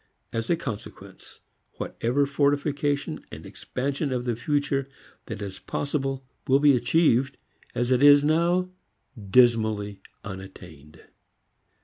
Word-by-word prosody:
As 115 0 -3
a 170 - +4
consequence 125 -10 -9 0.3
whatever 130 +5 -1
fortification 145 0 0
and - - -9
expansion 140 +2 -3
of 125 -1 -2
the 120 -2 0
future 135 +2 -1 0.4
that 110 -3 -5
is 95 -2 -7
possible 135 -2 -3 0.2
will 135 - +5
be 145 -1 +5
achieved 135 -1 +2 0.4
as 120 +1 0
it 125 0 +3
is 145 0 +8
now 170 +4 +2 0.6
dismally 110 -4 +3 0.2
unattained. 90 -6 -11
135 Hz, 110 wpm, -25 LUFS, 115-145 Hz, 0.6 s, is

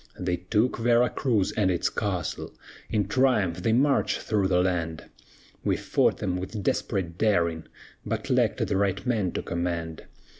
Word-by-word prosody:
"They 90 -1 -1
took 105 +8 0
Vera 120 +1 +3
Cruz 110 -8 +1
and 100 -3 +1
its 90 -2 +1
castle; 95 -6 -3 0.3
In 105 -3 0
triumph 105 -8 +2
they 110 - +1
marched 135 +4 +2
through 105 -3 0
the 90 -1 +3
land; 85 -3 -2 0.6
We - - +1
fought - - +1
them 90 - -2
with 95 +3 -5
desperate 85 -3 -1
daring, 85 -7 +1 0.4
But - - -3
lacked - - +2
the - - -1
right 100 0 0
man 110 -7 0
to - - -3
command. 85 -2 -3
95 Hz, 155 wpm, -26 LUFS, 90-110 Hz, 0.6 s, Vera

